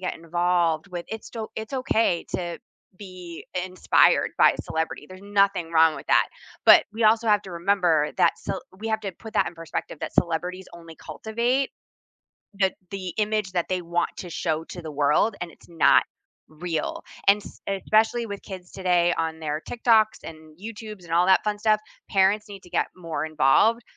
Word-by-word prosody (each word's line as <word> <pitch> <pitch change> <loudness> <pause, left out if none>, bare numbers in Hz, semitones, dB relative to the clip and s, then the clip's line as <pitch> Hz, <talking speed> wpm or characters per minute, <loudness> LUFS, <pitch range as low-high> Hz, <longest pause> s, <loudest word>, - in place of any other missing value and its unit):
get 185 - -3
involved 170 0 0
with 175 -2 -6
it 220 0 -6
sto 225 -2 -6
it's 220 +3 -6
okay 225 -9 +1
to 175 -2 -3 0.4
be 180 -4 -10
i - - +1
inspired 185 0 +3
by - - +6
a - - -4
celebrity, 160 -2 -3
there's 185 0 -12
nothing 200 -4 +1
wrong 160 -1 +5
with - - -9
that, - - +5 0.4
but, - - +9
we 220 +1 -1
also 225 +1 +4
have 210 -1 +4
to 190 - -10
remember 170 -4 +2
that - - +3
cel 190 - -4 0.2
we 225 - -4
have 220 0 0
to 195 -3 -5
put 220 +5 -12
that - - +3
in - - -6
perspective 165 -2 -6
that - - -4
celebrities 180 +2 -1
only 165 -1 -12
cultivate 240 +5 -1 0.9
the 190 -1 +3 0.2
the 185 -3 -5
image 210 -2 0
that 175 -2 -1
they 185 -1 -1
want 175 0 -1
to 180 - -7
show 160 -1 -2
to 175 +1 -9
the 160 - -6
world, 150 +9 +2
and 175 -2 -5
it's - - -21
not 165 -1 +5 0.5
real, 160 +1 -4 0.3
and 200 +1 +6
s - - -13
especially 220 +4 +1
with 200 -2 -7
kids 185 -2 -10
today 175 -2 +2
on 160 0 -2
their 155 0 -3
TikToks 220 -2 +3
and 155 0 -11
YouTubes 215 -2 -9
and 165 - -9
all 175 +1 +4
that 190 +2 +4
fun 210 -1 -1
stuff, 215 -1 +3 0.3
parents 200 +2 +2
need 195 -2 -10
to 180 - -16
get 175 - 0
more 165 -4 -4
involved 160 - +3
185 Hz, 190 wpm, -25 LUFS, 165-210 Hz, 0.9 s, but